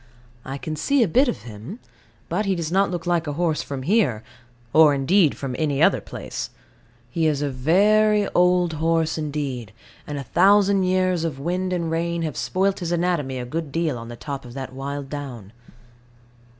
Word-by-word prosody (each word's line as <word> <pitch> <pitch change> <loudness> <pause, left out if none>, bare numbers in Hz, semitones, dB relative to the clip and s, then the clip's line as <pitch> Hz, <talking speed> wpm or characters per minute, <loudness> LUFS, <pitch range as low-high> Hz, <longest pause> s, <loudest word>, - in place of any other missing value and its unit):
I 135 +1 -5
can 155 +2 -5
see 275 - +2
a - - +1
bit 260 - +3
of 240 - -3
him: 115 - -9 0.5
but 210 - -1
he 195 - +2
does 165 -2 -3
not 195 +2 +3
look 175 -1 -4
like 175 -2 0
a 145 - -2
horse 160 -1 0
from 135 -2 -6
here, 155 - +2 0.5
or 155 -2 +6
indeed 155 +4 +3
from 135 -3 -4
any 145 -3 0
other - - +4
place; - - -6 0.6
he 160 +4 +1
is 145 -2 0
a 145 - -1
very 205 +9 +3
old 180 -1 +3
horse 160 +1 0
indeed, 140 -7 -4 0.4
and 145 - -4
a 140 - -4
thousand 195 - +4
years 185 -2 +1
of 155 -5 -3
wind 180 +5 -2
and 170 -3 -1
rain 170 +1 -1
have 155 -4 -3
spoilt 195 +1 0
his 175 -1 -3
anatomy 170 -6 0
a 125 - -4
good 155 +3 -4
deal 165 -2 0
on 115 -1 -7
the 120 - -8
top 140 +2 -6
of 120 0 -11
that 130 -1 -6
wild 140 +1 -5
down. 130 -8 -7
160 Hz, 190 wpm, -23 LUFS, 140-180 Hz, 0.6 s, or